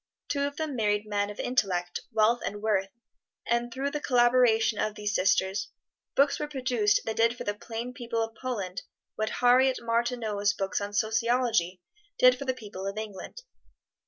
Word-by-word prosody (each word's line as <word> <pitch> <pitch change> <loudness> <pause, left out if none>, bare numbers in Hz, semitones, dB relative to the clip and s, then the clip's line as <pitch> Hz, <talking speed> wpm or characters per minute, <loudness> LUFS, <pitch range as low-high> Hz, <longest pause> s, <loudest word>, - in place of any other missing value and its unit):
Two 280 -1 0
of 285 - -7
them 310 -3 -3
married 210 -2 +1
men 205 -1 -1
of 205 - -9
intellect, 180 -8 0
wealth 225 +2 +3
and 205 - -4
worth, 205 -3 0 0.6
and 235 0 0
through 270 +4 -2
the 295 - -2
collaboration 240 -4 +3
of 215 -1 -1
these 210 0 -3
sisters, 190 +1 +1 0.5
books 280 0 +3
were 300 - -2
produced 250 -7 +1
that 220 - -3
did 230 +1 +3
for - - -5
the 205 - -1
plain 230 +3 -6
people 230 -3 -2
of 225 0 -6
Poland 200 -7 -4 0.3
what 215 0 -1
Harriet 255 +1 +4
Martineau's 230 -3 0
books 195 -1 -2
on 200 0 -4
sociology 220 -4 +1 0.4
did 255 0 +6
for 275 - -7
the 260 -1 0
people 200 -5 -7
of 195 +1 -4
England. 215 - -7
225 Hz, 170 wpm, -28 LUFS, 205-250 Hz, 0.6 s, did